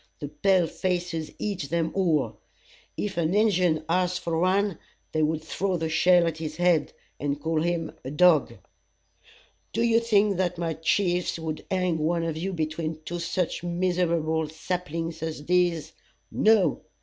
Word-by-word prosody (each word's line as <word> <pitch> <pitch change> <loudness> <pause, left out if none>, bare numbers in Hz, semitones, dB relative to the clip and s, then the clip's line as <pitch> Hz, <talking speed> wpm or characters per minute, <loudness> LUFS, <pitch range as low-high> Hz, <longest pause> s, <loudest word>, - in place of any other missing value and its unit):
The 145 - -5
pale 190 +1 +2
faces 175 -2 -2
eat 190 -9 -3
them 165 -1 0
all. 170 -7 +1 0.6
If 205 -4 -3
an 170 +2 +1
Injun 180 -7 +2
asked 180 +1 +1
for 165 -1 -1
one, 190 0 +1 0.3
they 155 - 0
would 155 0 0
throw 190 +2 -1
the 160 -1 -2
shell 175 +2 +4
at 160 -1 -2
his 155 -1 -5
head, 175 -3 +2 0.3
and 145 0 -2
call 160 +1 0
him 170 -1 -1
a 130 - -5
dog. 160 +1 +4 1.2
"Do 230 - +1
you 230 -1 +4
think 210 -4 +2
that 180 -1 0
my 165 -1 -1
chiefs 175 +3 0
would 160 -1 -5
hang 180 -3 0
one 165 +2 0
of 165 -2 -2
you 180 +5 -3
between 160 -1 -3
two 175 0 -4
such 170 +1 -2
miserable 170 -3 0
saplings 165 0 -4
as 160 -2 -4
these? 175 -2 +1 0.4
No! 215 -3 +3
170 Hz, 155 wpm, -26 LUFS, 160-180 Hz, 1.2 s, shell